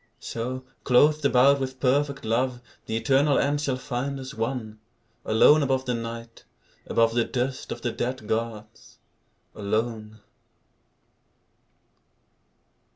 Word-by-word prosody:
So, 125 +3 -5 0.2
clothed 150 +4 +4
about 140 +1 +5
with 130 -1 -4
perfect 140 +1 +1
love, 120 +2 0 0.3
The 110 - -1
eternal 140 +4 +3
end 145 +1 +1
shall 135 -3 -1
find 135 +2 -3
us 130 +2 -7
one, 115 -3 -4 0.5
Alone 145 +8 +5
above 130 -1 0
the 125 - -1
Night, 115 0 -6 0.4
above 115 0 +2
The 120 0 +2
dust 130 +2 -3
of - - -6
the 120 - 0
dead 120 -1 -4
gods, 110 -1 -4 0.6
alone. 110 +1 -3
125 Hz, 115 wpm, -25 LUFS, 115-135 Hz, 0.6 s, about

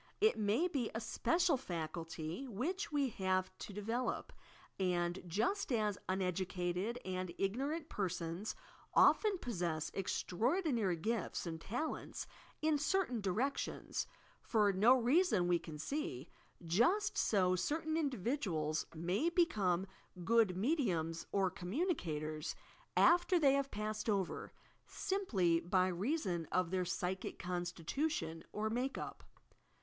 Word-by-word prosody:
It 435 +2 +5
may 220 - +2
be 270 -10 -1
a - - 0
special 335 +6 +2
faculty 165 - -4
which 310 - -2
we 285 -3 +2
have 185 -3 0
to - - -6
develop, 225 +5 -2 0.5
and, 175 -1 0
just 230 - 0
as 215 -4 +1
uneducated 185 +3 -1
and 185 -1 -2
igno 230 +9 0
rant 320 0 -3
persons 185 - -3 0.4
often 420 -3 +5
possess 170 - -2
extraordinary 225 - 0
gifts 215 +4 -2
and 165 -1 -5
tal 250 - -2
ents - - -7 0.4
in 310 -2 +3
certain 300 - +1
directions, 225 +9 -1 0.3
for 210 -3 +3
no 220 +7 +6
reason 245 - +3
we 175 -1 +3
can 155 -2 -8
see, 300 - -3 0.4
just 260 - +3
so 185 -3 +3
certain 310 - -1
individuals 215 - -1
may 180 - +1
become 200 - +2 0.4
good 225 -5 +4
mediums 185 - 0
or 195 -2 +2
communicators, 175 - -2 0.4
after 350 +1 +5
they 280 -5 +5
have 275 0 +1
passed 215 0 -3
over, 195 -4 -1 0.4
simply 195 - +1
by 185 +2 +2
reason 185 - -1
of 185 -2 +1
their 185 -1 +1
psychic 180 +1 -2
constitution 175 - -2
or 215 +1 -1
make 255 +4 -1
up. - - -6
205 Hz, 120 wpm, -36 LUFS, 180-275 Hz, 0.5 s, no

